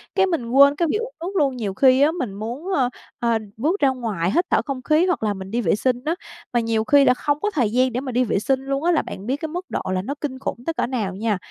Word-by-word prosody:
cái 385 Hz, -, +4 dB
mình 295 Hz, -10 st, -2 dB
quên 280 Hz, +2 st, +6 dB
cái 335 Hz, +2 st, +1 dB
việc -, -, +1 dB
uống 465 Hz, +2 st, -4 dB
nước 375 Hz, +4 st, -5 dB
luôn. 275 Hz, -4 st, +2 dB
Nhiều 205 Hz, -5 st, -3 dB
khi 260 Hz, +5 st, +4 dB
á, 295 Hz, +2 st, +5 dB
mình 260 Hz, -, -4 dB
muốn, 245 Hz, -, -5 dB
ờ, 260 Hz, -7 st, +2 dB, 0.3 s
ờ, 235 Hz, -1 st, +2 dB, 0.2 s
bước 315 Hz, -, 0 dB
ra 275 Hz, -, +5 dB
ngoài 215 Hz, -9 st, -2 dB
hít 345 Hz, +7 st, +2 dB
thở -, -, +4 dB
không 270 Hz, -3 st, -4 dB
khí 310 Hz, +3 st, +3 dB
hoặc 355 Hz, -11 st, 0 dB
là 210 Hz, -1 st, +1 dB
mình 190 Hz, 0 st, -8 dB
đi 240 Hz, +2 st, 0 dB
vệ 185 Hz, -5 st, +2 dB
sinh 245 Hz, +3 st, +1 dB
á, 330 Hz, +2 st, 0 dB, 0.4 s
mà 240 Hz, -, +3 dB
nhiều 225 Hz, -1 st, 0 dB
khi 280 Hz, +3 st, +5 dB
là -, -, +6 dB
không 290 Hz, +3 st, -1 dB
có 420 Hz, -, 0 dB
thời 235 Hz, -8 st, +1 dB
gian 255 Hz, 0 st, +2 dB
để 250 Hz, -, -1 dB
mà 265 Hz, -1 st, -5 dB
đi 250 Hz, +1 st, +2 dB
vệ 210 Hz, -, 0 dB
sinh 265 Hz, +5 st, +1 dB
luôn 275 Hz, +2 st, -2 dB
á, 350 Hz, -, +3 dB
là 325 Hz, -, +3 dB
bạn 190 Hz, -, -8 dB
biết 265 Hz, -, +1 dB
cái 315 Hz, 0 st, -5 dB
mức 355 Hz, +3 st, -5 dB
độ -, -, -2 dB
là 185 Hz, -, 0 dB
nó 260 Hz, +9 st, -4 dB
kinh 260 Hz, -3 st, -4 dB
khủng 270 Hz, -, -3 dB
tới 330 Hz, -, -1 dB
cỡ -, -, 0 dB
nào 215 Hz, -7 st, -2 dB
nha. 215 Hz, -1 st, 0 dB
260 Hz, 300 wpm, -22 LUFS, 225-305 Hz, 0.4 s, quên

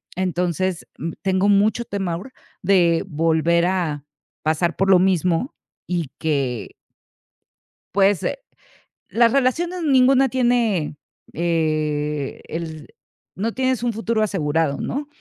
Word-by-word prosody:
Entonces, 180 Hz, 0 st, -1 dB
mm, 165 Hz, 0 st, -4 dB
tengo 190 Hz, +1 st, +2 dB
mucho 210 Hz, +4 st, +3 dB
temor 195 Hz, +1 st, -4 dB, 0.3 s
de 175 Hz, -3 st, +3 dB
volver 165 Hz, +1 st, +2 dB
a 165 Hz, -6 st, -1 dB, 0.4 s
pasar 160 Hz, +2 st, +1 dB
por 195 Hz, 0 st, +2 dB
lo 180 Hz, -, +7 dB
mismo 185 Hz, -, +1 dB, 0.3 s
y 170 Hz, -6 st, -2 dB
que 135 Hz, -8 st, -2 dB, 1.2 s
Pues, 195 Hz, -2 st, +3 dB
eh, -, -, -2 dB, 0.7 s
las 230 Hz, 0 st, +4 dB
relaciones, 330 Hz, +7 st, 0 dB
ninguna 270 Hz, -1 st, +5 dB
tiene, 235 Hz, -, +1 dB, 0.4 s
eh, 155 Hz, -3 st, -1 dB
el 160 Hz, -2 st, -6 dB, 0.5 s
no 215 Hz, +5 st, -2 dB
tienes 260 Hz, -2 st, 0 dB
un 235 Hz, -, 0 dB
futuro 225 Hz, 0 st, 0 dB
asegurado, 160 Hz, -7 st, 0 dB
¿no? 285 Hz, +2 st, -3 dB
185 Hz, 110 wpm, -21 LUFS, 160-230 Hz, 1.2 s, lo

